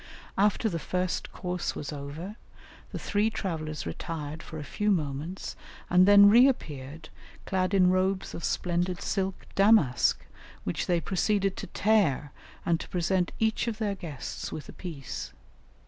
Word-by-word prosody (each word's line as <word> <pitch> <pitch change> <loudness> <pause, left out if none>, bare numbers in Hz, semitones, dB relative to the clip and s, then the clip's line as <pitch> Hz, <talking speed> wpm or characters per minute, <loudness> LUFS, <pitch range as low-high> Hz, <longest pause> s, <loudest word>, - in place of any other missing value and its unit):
After 210 +3 +2
the 170 -6 -2
first 180 +2 -2
course 180 -1 -3
was 145 0 -5
over 150 +8 -6 0.6
the - - -4
three 210 +2 +1
travellers 155 -8 -4
retired 150 - -5
for 160 - -8
a 150 - -5
few 210 +9 -1
moments 160 0 -2 0.4
and 180 +1 +6
then 200 0 +9
reappeared, 160 - +3 0.4
clad 185 +1 0
in 180 -1 +5
robes 185 +1 0
of 165 - -6
splendid 175 0 0
silk 195 -2 -2
damask, 195 - +4 0.4
which 90 - -2
they 175 -2 +2
proceeded 195 +1 +1
to - - -5
tear, 195 -10 +2 0.3
and 170 -1 +2
to - - -8
present 180 0 +1
each 220 +1 +1
of 225 -2 -2
their 210 -3 -1
guests 165 -8 -6
with 155 - -6
a - - -10
piece. 155 -8 -6
180 Hz, 145 wpm, -28 LUFS, 155-200 Hz, 0.6 s, then